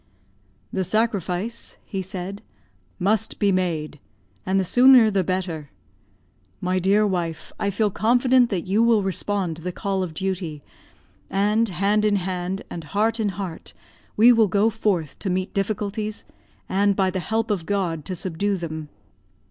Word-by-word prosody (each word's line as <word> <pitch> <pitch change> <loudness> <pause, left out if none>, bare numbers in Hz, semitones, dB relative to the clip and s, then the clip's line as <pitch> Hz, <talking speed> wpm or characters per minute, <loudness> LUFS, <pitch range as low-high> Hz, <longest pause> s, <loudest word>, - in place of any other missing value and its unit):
"The 190 - 0
sacrifice," 210 0 -1
he 195 -3 -4
said, 190 +2 -6 0.6
"must 215 +3 +1
be 200 -1 +2
made, 165 -5 -1 0.5
and 190 +1 +2
the - - +2
sooner 245 +3 +6
the 195 -2 +1
better. 175 -5 -3 0.9
My 185 0 0
dear 200 +3 +3
wife, 175 -5 -3
I 200 - 0
feel 205 +1 0
confident 245 +3 +3
that 185 -5 -2
you 200 +4 +2
will 230 -3 +4
respond 190 -2 -2
to - - -11
the 180 +2 -3
call 195 +1 -2
of 170 -4 -4
duty, 180 -5 -3 0.7
and, 210 +3 +2
hand 200 +4 +1
in 210 -1 +3
hand 185 0 -3
and 170 - -7
heart 220 +7 0
in 215 -2 +1
heart 190 -3 -6 0.4
we 230 +4 +8
will 225 -3 +5
go 205 +3 +2
forth 195 -8 -1
to 195 - -3
meet 185 +1 -2
difficulties, 210 +1 -2 0.4
and, 200 +1 +2
by 190 -1 +2
the 185 - -2
help 220 +5 -1
of 180 -6 -2
God, 180 -6 -1
to 185 - -4
subdue 190 +3 -2
them." 160 -3 -6
195 Hz, 155 wpm, -23 LUFS, 180-210 Hz, 0.9 s, we